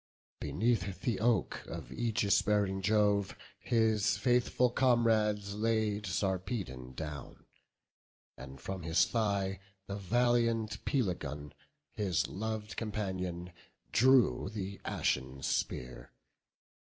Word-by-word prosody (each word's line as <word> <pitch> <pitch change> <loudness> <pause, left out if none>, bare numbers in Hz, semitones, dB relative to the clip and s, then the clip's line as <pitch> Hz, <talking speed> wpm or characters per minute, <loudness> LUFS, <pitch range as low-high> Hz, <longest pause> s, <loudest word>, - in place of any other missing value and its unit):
Beneath 95 - 0
the 120 -7 0
oak 110 -4 +1
of - - -7
aegis 110 - +2
bearing 100 -2 +1
Jove 105 0 +2 0.2
His 110 -3 +2
faithful 125 0 +2
comrades 110 -5 +2
laid 105 -1 0
Sarpedon 95 - -2
down, 75 -1 -7 0.9
And 65 0 -10
from 95 +6 -5
his 80 -1 +3
thigh 100 -4 0 0.3
the 100 +1 -5
valiant 115 +1 +1
Pelagon, 75 - -2 0.4
His 95 -6 0
lov'd 110 +1 -4
companion, 95 -5 -3 0.4
drew 120 - +4
the 100 -2 -5
ashen 65 0 -1
spear. 60 -1 -2
100 Hz, 95 wpm, -32 LUFS, 90-115 Hz, 0.9 s, drew